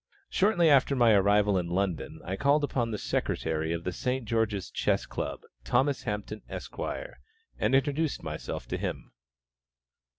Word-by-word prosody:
Shortly 190 Hz, -4 st, +3 dB
after 140 Hz, -1 st, +5 dB
my 120 Hz, -3 st, +5 dB
arrival 100 Hz, -1 st, +4 dB
in 85 Hz, -, -3 dB
London, 90 Hz, -1 st, -2 dB
I 95 Hz, -, -2 dB
called 140 Hz, +6 st, +3 dB
upon 125 Hz, -5 st, 0 dB
the 110 Hz, -, -2 dB
Secretary 80 Hz, -4 st, -1 dB
of 85 Hz, 0 st, -2 dB
the 90 Hz, -, -2 dB
St. 125 Hz, +7 st, -2 dB
George's 110 Hz, -4 st, -1 dB
Chess -, -, +1 dB
Club, -, -, -4 dB, 0.2 s
Thomas 135 Hz, -, +2 dB
Hampton, 105 Hz, +1 st, -4 dB
Esq., -, -, -7 dB, 0.8 s
and 130 Hz, -, +3 dB
introduced 145 Hz, +3 st, +1 dB
myself -, -, -5 dB
to -, -, -1 dB
him. -, -, -4 dB
110 Hz, 145 wpm, -29 LUFS, 95-135 Hz, 0.8 s, after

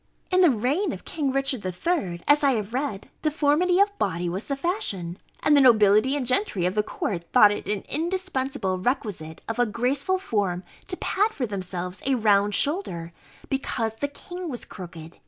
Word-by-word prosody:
In 370 Hz, 0 st, +4 dB
the 355 Hz, -, +7 dB
reign 270 Hz, -, 0 dB
of -, -, -9 dB
King 285 Hz, -4 st, -1 dB
Richard 275 Hz, -3 st, 0 dB
III, 185 Hz, -, -2 dB
as 290 Hz, +1 st, +5 dB
I 275 Hz, -1 st, +4 dB
have 215 Hz, -1 st, -3 dB
read, 255 Hz, -7 st, -3 dB
deformity 310 Hz, +4 st, +2 dB
of 405 Hz, 0 st, +3 dB
body 175 Hz, -3 st, -1 dB
was 185 Hz, +5 st, -3 dB
the 275 Hz, -, -1 dB
fashion, 205 Hz, -, -2 dB, 0.2 s
and 300 Hz, -, +4 dB
the 285 Hz, -, +6 dB
nobility 220 Hz, +1 st, +5 dB
and 270 Hz, -, -2 dB
gentry 250 Hz, -, +1 dB
of 180 Hz, -, +1 dB
the 210 Hz, -, +2 dB
court 175 Hz, -4 st, -4 dB
thought 210 Hz, -5 st, +7 dB
it 205 Hz, -, -4 dB
an 205 Hz, -2 st, -2 dB
indispensable 290 Hz, -, -2 dB
requisite 185 Hz, -, -3 dB
of 225 Hz, +2 st, -3 dB
a 245 Hz, -, +4 dB
graceful 270 Hz, -, 0 dB
form 200 Hz, -, -1 dB, 0.2 s
to 360 Hz, -, -1 dB
pad 420 Hz, +3 st, +1 dB
for 265 Hz, -, -2 dB
themselves 185 Hz, -3 st, -5 dB
a 270 Hz, -, +3 dB
round 205 Hz, -3 st, +3 dB
shoulder, 180 Hz, -, -1 dB, 0.3 s
because 230 Hz, -5 st, -2 dB
the 285 Hz, -, -1 dB
king 355 Hz, +4 st, -8 dB
was 245 Hz, -4 st, -5 dB
crooked. 170 Hz, -3 st, -10 dB
245 Hz, 180 wpm, -25 LUFS, 195-295 Hz, 0.3 s, the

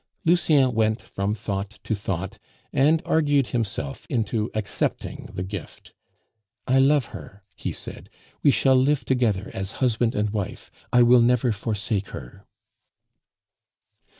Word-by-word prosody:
Lucien 155 Hz, -6 st, +4 dB
went 110 Hz, 0 st, +1 dB
from 100 Hz, +2 st, -3 dB
thought 100 Hz, -2 st, -3 dB
to -, -, -1 dB
thought, 95 Hz, -2 st, -4 dB, 0.3 s
and 155 Hz, +4 st, +3 dB
argued 145 Hz, -4 st, +3 dB
himself 100 Hz, -, -3 dB
into 110 Hz, -2 st, -1 dB
accepting 110 Hz, -1 st, -2 dB
the 90 Hz, -, -3 dB
gift. 95 Hz, -1 st, -8 dB, 0.7 s
"I 130 Hz, +1 st, +3 dB
love 140 Hz, 0 st, +4 dB
her," 100 Hz, 0 st, -10 dB
he -, -, -4 dB
said; -, -, -8 dB, 0.3 s
"we -, -, +5 dB
shall 135 Hz, -1 st, +4 dB
live 135 Hz, +2 st, +2 dB
together 115 Hz, -6 st, 0 dB
as 95 Hz, +2 st, -4 dB
husband 120 Hz, -2 st, +1 dB
and 105 Hz, 0 st, 0 dB
wife; 100 Hz, -4 st, -5 dB, 0.2 s
I 125 Hz, 0 st, +6 dB
will 120 Hz, 0 st, +6 dB
never 125 Hz, 0 st, +3 dB
forsake 105 Hz, -1 st, -2 dB
her!" 100 Hz, 0 st, -10 dB
115 Hz, 130 wpm, -24 LUFS, 100-130 Hz, 0.7 s, I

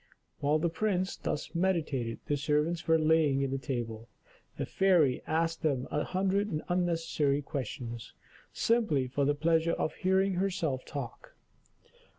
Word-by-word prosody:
While 145 Hz, +2 st, +2 dB
the 165 Hz, +2 st, +1 dB
prince 185 Hz, +2 st, -1 dB
thus 145 Hz, -, -4 dB
meditated, 155 Hz, -10 st, 0 dB
the 145 Hz, -, 0 dB
servants 150 Hz, +4 st, 0 dB
were 160 Hz, 0 st, +5 dB
laying 155 Hz, -4 st, +3 dB
the 135 Hz, -, -1 dB
table, 120 Hz, -5 st, -4 dB, 0.5 s
the -, -, -2 dB
fairy 175 Hz, -9 st, +3 dB
asking 165 Hz, 0 st, +1 dB
them -, -, -7 dB
a 150 Hz, -, 0 dB
hundred 195 Hz, +2 st, 0 dB, 0.2 s
unnecessary 165 Hz, -5 st, +1 dB
questions, 120 Hz, -5 st, -5 dB, 0.4 s
simply 220 Hz, -, +2 dB
for 140 Hz, +2 st, 0 dB
the 145 Hz, +1 st, +2 dB
pleasure 165 Hz, +2 st, +2 dB
of -, -, -1 dB
hearing 190 Hz, +1 st, +2 dB
herself 175 Hz, -8 st, -1 dB
talk. 140 Hz, -5 st, -7 dB
160 Hz, 135 wpm, -30 LUFS, 140-175 Hz, 0.5 s, were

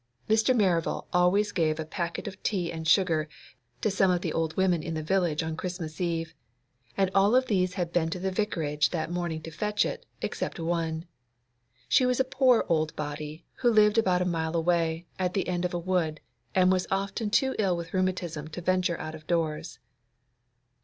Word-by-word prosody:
Mr. 220 Hz, +4 st, +3 dB
Merival 180 Hz, -7 st, +1 dB
always 180 Hz, +4 st, +3 dB
gave 160 Hz, -3 st, 0 dB
a 160 Hz, -, -2 dB
packet 170 Hz, +2 st, -4 dB
of 195 Hz, -1 st, -8 dB
tea 180 Hz, -5 st, -1 dB
and 160 Hz, -1 st, -5 dB
sugar 160 Hz, -4 st, +3 dB, 0.5 s
to 215 Hz, -, +1 dB
some 195 Hz, 0 st, +3 dB
of 180 Hz, -1 st, +2 dB
the 165 Hz, -, -2 dB
old 160 Hz, -1 st, -1 dB
women 185 Hz, -3 st, +2 dB
in 165 Hz, +1 st, -4 dB
the 155 Hz, -, -3 dB
village 170 Hz, -2 st, +1 dB
on 160 Hz, 0 st, -3 dB
Christmas 175 Hz, -2 st, -5 dB
Eve, 165 Hz, -1 st, -1 dB, 0.6 s
and 195 Hz, -1 st, +2 dB
all 200 Hz, +4 st, +4 dB
of 255 Hz, 0 st, +4 dB
these 185 Hz, -4 st, +1 dB
had 175 Hz, -3 st, -2 dB
been 165 Hz, -2 st, +2 dB
to 165 Hz, -, -3 dB
the 190 Hz, +1 st, -2 dB
Vicarage 160 Hz, -7 st, 0 dB
that 165 Hz, -1 st, -3 dB
morning 170 Hz, -3 st, -3 dB
to 165 Hz, -, -7 dB
fetch 210 Hz, +6 st, 0 dB
it, -, -, -5 dB, 0.2 s
except -, -, -3 dB
one. 165 Hz, -1 st, -1 dB, 0.8 s
She 255 Hz, -, +4 dB
was 250 Hz, 0 st, +1 dB
a -, -, +5 dB
poor 260 Hz, -2 st, +3 dB
old 155 Hz, -3 st, +1 dB
body, 150 Hz, +2 st, -5 dB
who 245 Hz, -, +3 dB
lived 215 Hz, 0 st, +5 dB
about 180 Hz, -4 st, +2 dB
a -, -, -3 dB
mile 165 Hz, -2 st, -1 dB
away, 165 Hz, 0 st, +1 dB
at 180 Hz, -1 st, -1 dB
the 195 Hz, -, 0 dB
end 180 Hz, 0 st, -1 dB
of 180 Hz, -, -2 dB
a -, -, +1 dB
wood, 170 Hz, -3 st, -1 dB, 0.4 s
and 185 Hz, 0 st, +5 dB
was 185 Hz, -1 st, +1 dB
often 200 Hz, +3 st, -1 dB
too 265 Hz, +5 st, +2 dB
ill 190 Hz, -4 st, +2 dB
with 170 Hz, 0 st, -7 dB
rheumatism 180 Hz, -5 st, -1 dB
to 160 Hz, +3 st, -7 dB
venture 180 Hz, -1 st, +1 dB
out 155 Hz, 0 st, -5 dB
of 155 Hz, 0 st, -11 dB
doors. 160 Hz, -3 st, -1 dB
175 Hz, 195 wpm, -28 LUFS, 160-190 Hz, 0.8 s, a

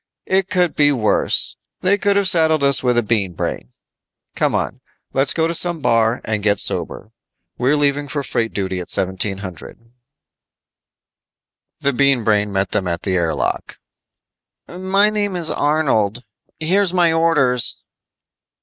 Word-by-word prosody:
"It 190 Hz, 0 st, 0 dB
could 180 Hz, -5 st, +1 dB
be 145 Hz, -1 st, +3 dB
worse. 115 Hz, -6 st, 0 dB, 0.2 s
They 190 Hz, +2 st, +3 dB
could've 200 Hz, -1 st, +1 dB
saddled 160 Hz, -4 st, +3 dB
us 140 Hz, -1 st, +5 dB
with 125 Hz, -2 st, +1 dB
a 120 Hz, -, +3 dB
Bean 105 Hz, -4 st, -1 dB
Brain. 60 Hz, -6 st, -5 dB, 0.6 s
Come -, -, 0 dB
on. -, -, -3 dB, 0.3 s
Let's 135 Hz, +1 st, +2 dB
go 160 Hz, -, +1 dB
to 165 Hz, -, -1 dB
some 170 Hz, 0 st, +2 dB
bar 115 Hz, -3 st, +1 dB
and 110 Hz, -1 st, -2 dB
get 100 Hz, -1 st, +1 dB
sober. -, -, 0 dB, 0.5 s
We're 130 Hz, +4 st, +2 dB
leaving 145 Hz, 0 st, 0 dB
for 140 Hz, +1 st, -4 dB
freight 115 Hz, -3 st, -2 dB
duty 95 Hz, -2 st, -3 dB
at 90 Hz, -, -8 dB
1700." 95 Hz, +3 st, -3 dB, 1.9 s
The 140 Hz, -, +1 dB
Bean 140 Hz, -2 st, +2 dB
Brain 105 Hz, -1 st, +1 dB
met 95 Hz, -1 st, -1 dB
them 95 Hz, -, -1 dB
at 85 Hz, -1 st, -3 dB
the 95 Hz, -, -2 dB
air 85 Hz, -3 st, 0 dB
lock. -, -, -3 dB, 0.9 s
"Name 200 Hz, +2 st, 0 dB
is 170 Hz, -3 st, -2 dB
Arnold. 130 Hz, -7 st, 0 dB, 0.4 s
Here's 185 Hz, +3 st, +1 dB
my 170 Hz, -2 st, +3 dB
orders." 150 Hz, -7 st, +1 dB
140 Hz, 140 wpm, -18 LUFS, 105-165 Hz, 1.9 s, us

